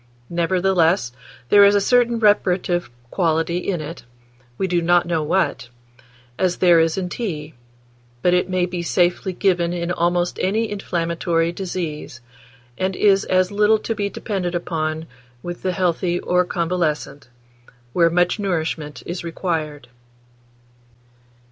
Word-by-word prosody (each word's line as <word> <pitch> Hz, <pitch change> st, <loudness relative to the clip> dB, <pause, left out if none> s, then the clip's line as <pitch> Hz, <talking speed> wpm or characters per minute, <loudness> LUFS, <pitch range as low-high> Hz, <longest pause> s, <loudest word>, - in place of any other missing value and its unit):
Nevertheless, 175 Hz, -4 st, +2 dB, 0.4 s
there 205 Hz, 0 st, +7 dB
is 200 Hz, 0 st, +6 dB
a -, -, +5 dB
certain 240 Hz, +3 st, +3 dB
reparative 185 Hz, -5 st, +2 dB, 0.2 s
quality 165 Hz, -1 st, 0 dB
in 180 Hz, -2 st, -2 dB
it, 155 Hz, +3 st, -8 dB, 0.5 s
we -, -, 0 dB
do 175 Hz, -2 st, +1 dB
not 175 Hz, +1 st, +3 dB
know 170 Hz, -2 st, 0 dB
what, 150 Hz, -6 st, 0 dB, 0.7 s
as 180 Hz, -2 st, +1 dB
there 175 Hz, -2 st, +5 dB
is 165 Hz, +1 st, +1 dB
in 185 Hz, -2 st, -2 dB
tea; 165 Hz, -7 st, -5 dB, 0.7 s
but 180 Hz, -, +4 dB
it 180 Hz, +1 st, +1 dB
maybe 180 Hz, -1 st, -1 dB
safely 175 Hz, +2 st, +1 dB
given 175 Hz, -2 st, +1 dB
in 170 Hz, 0 st, -2 dB
almost 175 Hz, 0 st, 0 dB
any 215 Hz, +4 st, 0 dB
inflammatory 170 Hz, -3 st, -1 dB
disease, 170 Hz, -8 st, -5 dB, 0.6 s
and 185 Hz, 0 st, -1 dB
is 195 Hz, -1 st, +3 dB
as 185 Hz, 0 st, +2 dB
little 210 Hz, +2 st, +4 dB
to 225 Hz, -, -3 dB
be 205 Hz, -2 st, -2 dB
depended 185 Hz, -5 st, -3 dB
upon 160 Hz, -2 st, -2 dB, 0.4 s
with 175 Hz, 0 st, -6 dB
the 185 Hz, -, 0 dB
healthy 180 Hz, -1 st, 0 dB
or 180 Hz, 0 st, +2 dB
convalescent, 165 Hz, -5 st, -2 dB, 0.7 s
where 170 Hz, -1 st, +4 dB
much 175 Hz, +4 st, +1 dB
nourishment 160 Hz, -6 st, -3 dB
is 175 Hz, +1 st, -5 dB
required." 160 Hz, -5 st, -3 dB
175 Hz, 130 wpm, -21 LUFS, 165-190 Hz, 0.7 s, there